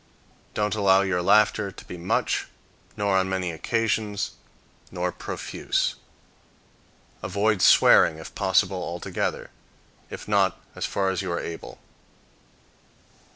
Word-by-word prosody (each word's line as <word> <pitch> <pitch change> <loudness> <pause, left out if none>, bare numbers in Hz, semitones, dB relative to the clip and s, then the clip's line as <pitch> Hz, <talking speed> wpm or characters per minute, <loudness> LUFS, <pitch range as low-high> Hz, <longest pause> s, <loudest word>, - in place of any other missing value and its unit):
Don't 105 0 0
allow 100 -2 +4
your 95 -2 0
laughter 105 +1 +3 0.2
be - - -7
much, 90 +2 -1 0.5
nor 100 -1 +1
on 95 0 +1
many 95 -2 -1
occasions, 105 +3 -1 0.6
nor 90 0 -2
profuse. - - -2 1.3
Avoid 105 -1 0
swearing, 80 - +6
if 80 - -10
possible, 95 0 +1
altogether; 85 0 -3 0.6
if - - -8
not, - - +2
as - - -3
far 95 -1 0
as 95 - -2
you 95 -2 -4
are 85 - -1
able. 85 - -7
95 Hz, 110 wpm, -25 LUFS, 90-105 Hz, 1.3 s, swearing